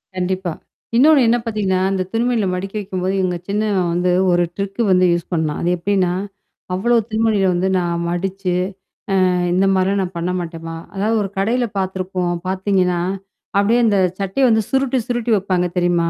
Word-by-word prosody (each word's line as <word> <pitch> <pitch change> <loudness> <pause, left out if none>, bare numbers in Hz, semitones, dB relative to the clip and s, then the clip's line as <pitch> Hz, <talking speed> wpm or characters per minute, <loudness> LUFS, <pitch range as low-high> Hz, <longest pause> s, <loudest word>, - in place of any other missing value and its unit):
கண்டிப்பா. 185 0 -2 0.5
இன்னொன்னு 295 +2 +6
என்னா 235 - +4
பாத்தீங்கன்னா, 200 -4 0
அந்த 190 - 0
துணிமணிகள 230 -3 +1
மடிக்க 195 +3 -5
வைக்கும்போது, 185 -1 -2
இவுங்க 180 -2 0
சின்னவன் 200 -4 0
வந்து 180 +1 +1 0.2
ஒரு 175 0 +3
ட்ரிக்கு 200 +2 -3
வந்து 185 0 +4
யூஸ் 170 +1 -4
பண்ணான். 160 -3 -1
அது 175 - +1
எப்டின்னா, 185 0 +1 0.6
அவ்வளோ 235 +6 +2
துணிமணிகள 215 -3 +2
வந்து 180 +2 0
நான் 170 -1 -1
மடிச்சு. 185 +1 -2 0.7
அ - - +2 0.2
இந்த 185 +2 +3
மாரிலாம் 195 +1 +1
நான் 185 -1 -4
பண்ண 170 +2 -1
மாட்டேன்மா 165 -1 -6 0.2
அதாவது 210 +4 0
ஒரு 195 - -4
கடையில 235 +6 +1
பாத்துருப்போம் 185 -1 -2
பாத்தீங்கன்னா, 185 -2 +1 0.6
அப்படியே 220 +4 +3
அந்த 210 -3 +3 0.2
சட்டைய 200 +7 +1
வந்து 220 -1 +3
சுருட்டி 265 -1 +1
சுருட்டி 240 -1 -1
வப்பாங்க 185 -2 0
தெரியுமா? 175 -1 +2
190 Hz, 155 wpm, -19 LUFS, 180-210 Hz, 0.7 s, இன்னொன்னு